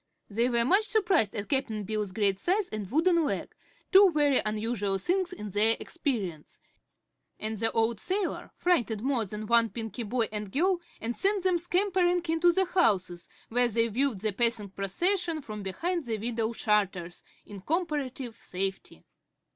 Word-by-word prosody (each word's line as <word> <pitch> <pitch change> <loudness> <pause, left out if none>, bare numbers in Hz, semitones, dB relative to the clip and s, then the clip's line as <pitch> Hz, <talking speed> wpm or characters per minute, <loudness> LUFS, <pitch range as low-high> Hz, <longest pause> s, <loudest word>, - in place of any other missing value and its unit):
They 230 +4 +1
were 235 -1 +2
much 400 - +3
surprised 380 - +2
at 205 -1 -4
Cap'n 240 -7 -1
Bill's 210 -1 -2
great 195 -1 +1
size 380 - +1
and 210 -3 -5
wooden 335 - +3
leg 290 - -3 0.4
two 390 0 +8
very 295 -4 +3
unusual 215 -2 -1
things 360 - 0
in 210 -1 -7
their 220 +3 +3
experience 210 - -4 0.8
and 220 +1 -3
the 225 +2 0
old 225 -1 +1
sailor 380 0 -2
frightened 235 - +1
more 260 -4 0
than 210 +2 -6
one 230 +1 +4
Pinky 225 0 -5
boy 230 +1 -1
and 210 -2 -4
girl 355 - +1 0.2
and 235 +1 -3
sent 395 -1 +1
them 365 -2 +2
scampering 355 0 +1
into 330 +2 +4
the 380 +2 +1
houses, 195 - +1 0.2
where 245 +1 +3
they 230 0 +1
viewed 240 -2 0
the 215 0 0
passing 230 -2 +1
procession 335 - 0
from 215 -7 -7
behind 330 - -3
the 225 -2 -2
window 225 +1 -2
shutters, 195 -6 -1 0.2
in 200 -2 -10
comparative 285 - -2
safety. 195 -3 -4
235 Hz, 160 wpm, -28 LUFS, 210-345 Hz, 0.8 s, two